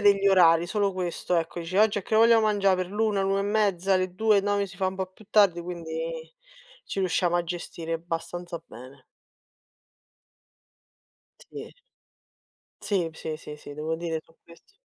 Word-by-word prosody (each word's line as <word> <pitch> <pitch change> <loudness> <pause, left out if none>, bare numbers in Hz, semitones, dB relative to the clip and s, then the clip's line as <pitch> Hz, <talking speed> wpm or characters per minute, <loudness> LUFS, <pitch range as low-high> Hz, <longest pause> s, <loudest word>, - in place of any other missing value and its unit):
degli 200 -1 +4
orari, 170 -3 +5
solo 200 0 0
questo 180 -1 -2
ecco. 170 +1 -2
Dice: 180 +4 -2
"Oggi 210 -1 +4
a - - -5
che 220 - 0
ora 225 - +7
vogliamo 230 -1 +5
mangià 200 -2 +3
per 185 -1 -2
l'1, 210 0 0
l'1 195 0 +1
e - - 0
mezza, 200 -3 +1
le 185 -1 0
2? 215 0 +3
No, 205 0 0
si 185 -1 -13
fa 190 -1 0
un 190 - -7
po' 190 -1 -2
più 185 +3 -19
tardi", 195 -5 +4
quindi 165 -2 -6 0.5
ci - - -6
riusciamo 180 -1 +1
a 175 - 0
gestire 165 -1 -4
abbastanza 170 0 -5
bene. 130 +3 -13 2.5
Sì. - - -9 1.1
Sì, 180 -6 0
sì, 160 -1 -5
sì, 150 -1 -10
sì, 145 - -11
devo 155 +2 -3
dire 165 -1 -3
su 165 - -26
ques 170 - -20
180 Hz, 170 wpm, -26 LUFS, 165-200 Hz, 2.5 s, ora